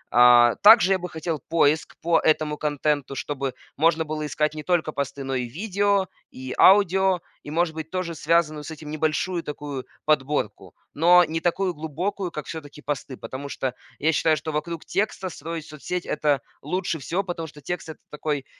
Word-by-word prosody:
А, 120 -1 +7
также 205 -2 +8
я 190 - +3
бы 180 0 -5
хотел 160 -1 -3
поиск 155 -1 +2
по 170 0 +3
этому 155 -1 +1
контенту, 145 -2 -1
чтобы 135 -2 -3 0.2
можно 160 +1 +3
было 155 0 -4
искать 150 +1 0
не 155 - -6
только 165 -1 0
посты, 140 -1 -4
но 135 0 -3
и 125 -2 -1
видео, 200 - 0 0.2
и 130 0 -7
аудио, 190 -2 +5 0.2
и, - - -10
может 165 +1 0
быть, 160 0 -6
тоже 185 -2 -3
связанную 155 -1 +1
с - - -8
этим 155 -1 -8
небольшую 160 +3 -1
такую 145 -3 -6 0.2
подборку. 150 -1 0 0.2
Но 175 +3 +6
не 160 +1 -3
такую 180 +2 0
глубокую, 175 +5 -3
как 150 -3 -6
всё-таки 150 -2 -9
посты, 140 -2 -4
потому 140 +2 -7
что 130 -2 -3 0.2
я 155 +2 +2
считаю, 155 +1 +2
что 155 +2 -4
вокруг 160 +2 -4
текста 195 -2 -1
строить 165 -1 -6
соцсеть- 170 +4 -5
это 150 -2 +1 0.2
лучше 175 +2 -2
всего, 175 +8 -2
потому 175 -3 -5
что 150 -1 -14
текст- 175 +2 -5
это 160 - -9
такой 150 -2 -3
155 Hz, 175 wpm, -24 LUFS, 145-175 Hz, 0.2 s, также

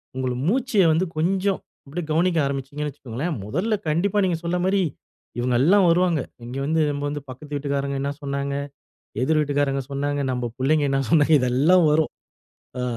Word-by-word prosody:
உங்க 130 0 -2 0.2
மூச்ச 240 -2 +2
வந்து 175 +4 +1
கொஞ்சம் 190 +4 +1 0.3
அப்படியே 155 +4 -5
கவனிக்க 170 +2 +2
ஆரம்பிச்சீங்கன்னு 140 +2 -3
வச்சுக்கோங்களன். 140 +5 -4
முதல்ல 185 - 0
கண்டிப்பா 190 +6 +1
நீங்க 175 -3 0
சொன்ன 175 +1 -1
மாதிரி 195 +1 +2 0.6
இவங்க 125 0 +1
எல்லாம் 190 +4 +5
வருவாங்க, 170 -2 +3 0.3
இங்க 125 +3 -6
வந்து 160 +2 +1
நம்ம 145 0 -4
வந்து 145 0 -4
பக்கத்து 145 +3 -9
வீட்டுக்காரங்க 140 -1 -2
என்ன 140 +1 -1
சொன்னாங்க, 140 0 -3 0.7
எதிர் 155 +4 +2
வீட்டுக்காரங்க 145 -2 0
சொன்னாங்க, 145 +1 -1
நம்ம 125 -1 -2
புள்ளைங்க 145 +3 +2
என்ன 135 0 +1
சொன்னாங்க 155 -1 +5
இதெல்லாம் 145 +8 +4
வரும். 155 +1 +2 0.7
அ 125 - -2
150 Hz, 155 wpm, -23 LUFS, 140-175 Hz, 0.7 s, எல்லாம்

